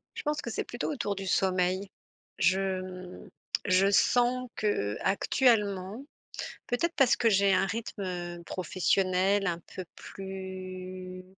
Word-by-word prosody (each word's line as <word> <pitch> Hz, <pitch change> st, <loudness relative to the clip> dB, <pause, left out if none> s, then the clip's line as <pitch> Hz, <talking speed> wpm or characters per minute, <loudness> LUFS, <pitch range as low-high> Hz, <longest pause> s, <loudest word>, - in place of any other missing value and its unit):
Je -, -, -5 dB
pense 300 Hz, 0 st, -1 dB
que 235 Hz, -, -5 dB
c'est 220 Hz, -, -2 dB
plutôt 240 Hz, -, -3 dB
autour 205 Hz, -7 st, -2 dB
du 195 Hz, 0 st, -5 dB
sommeil. 185 Hz, +1 st, +1 dB, 0.5 s
Je, 190 Hz, 0 st, +2 dB
mmh, 185 Hz, -1 st, -9 dB, 0.4 s
je 185 Hz, +2 st, +4 dB
sens 245 Hz, +4 st, +3 dB
qu'actuellement 205 Hz, -, +1 dB, 0.6 s
peut-être 330 Hz, +8 st, 0 dB
parce 270 Hz, -4 st, +5 dB
que 230 Hz, -, +3 dB
j'ai 195 Hz, -1 st, +4 dB
un 185 Hz, +1 st, +3 dB
rythme 180 Hz, -5 st, -4 dB
professionnel 185 Hz, +2 st, +1 dB
un 170 Hz, -2 st, -1 dB
peu 185 Hz, -, -4 dB
plus, 185 Hz, -1 st, -7 dB
190 Hz, 120 wpm, -29 LUFS, 185-210 Hz, 0.6 s, parce